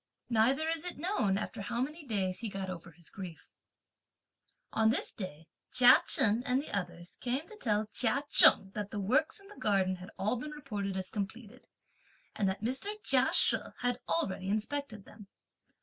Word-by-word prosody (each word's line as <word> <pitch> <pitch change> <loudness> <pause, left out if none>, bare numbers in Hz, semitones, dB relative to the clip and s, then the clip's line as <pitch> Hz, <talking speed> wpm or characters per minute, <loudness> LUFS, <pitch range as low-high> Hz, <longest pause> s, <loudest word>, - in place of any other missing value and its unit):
Neither 255 +8 +2
is 325 -1 -1
it 360 - -5
known 280 - 0
after 205 - -5
how 235 +4 -3
many 300 +6 -3
days 190 -5 -1
he 230 - -4
got 195 -1 -5
over 175 -1 -8
his 170 0 -14
grief. 175 -5 -10 1.2
On 220 0 +3
this 230 - -1
day, 165 -6 -7 0.3
Chia 250 0 +7
Chen 220 +2 +4
and 250 +1 +1
the 285 - -5
others 175 -2 -5
came 260 +5 -2
to 435 - -12
tell 215 - 0
Chia 255 +4 +1
Cheng 195 -8 +7
that 205 -1 -5
the 210 - -5
works 265 - +1
in 395 - -17
the 410 - -15
garden 195 -6 +1
had 185 +1 -11
all 215 +5 -1
been 300 - -6
reported 205 -10 -5
as 185 -1 -5
completed, 220 +3 -6 0.7
and 200 -3 +1
that 190 +3 -4
Mr. 265 - -1
Chia - - +4
She - - +4 0.2
had 245 -1 0
already 190 +3 -1
inspected 215 0 -3
them. 210 -2 -14
215 Hz, 180 wpm, -31 LUFS, 190-255 Hz, 1.2 s, Chia